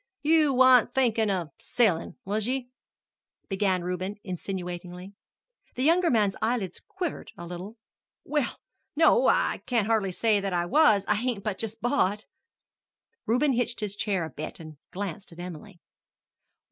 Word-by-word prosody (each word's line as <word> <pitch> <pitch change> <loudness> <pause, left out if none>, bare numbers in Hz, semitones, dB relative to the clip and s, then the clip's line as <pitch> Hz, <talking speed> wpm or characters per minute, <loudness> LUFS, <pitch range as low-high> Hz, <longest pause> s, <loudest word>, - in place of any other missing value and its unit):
"You 310 -1 +4
wan't 255 -2 +6
thinkin' 230 -4 +2
of 175 -5 -2
sellin', 200 -9 +1
was 210 +2 -1
ye?" 255 -1 -2 0.8
began 190 -2 +1
Reuben 180 +3 -3
insinuatingly. 180 0 -6 0.6
The 255 - -1
younger 340 +3 +4
man's 210 -5 +2
eyelid 220 -6 0
quivered 360 -5 -5
a 175 - -7
little. 180 +6 -8 0.5
"Well, 295 -5 -1 0.4
no, 330 +11 +5
I - - +2
can't 235 -5 +1
hardly 215 -4 +1
say 215 +2 +2
that 195 -1 -3
I 175 0 +1
was. 215 - +4
I - - +4
hain't 225 -1 -2
but 205 -2 -3
just 225 0 -5
bought." 215 -5 +1 1.0
Reuben 255 +5 +3
hitched 240 -1 -1
his 205 -1 -3
chair 195 -5 -1
a 160 - -8
bit 155 +4 -7
and 155 -2 -10
glanced 195 -1 -6
at 170 - -14
Emily. 175 +1 -9
210 Hz, 145 wpm, -27 LUFS, 185-245 Hz, 1.0 s, wan't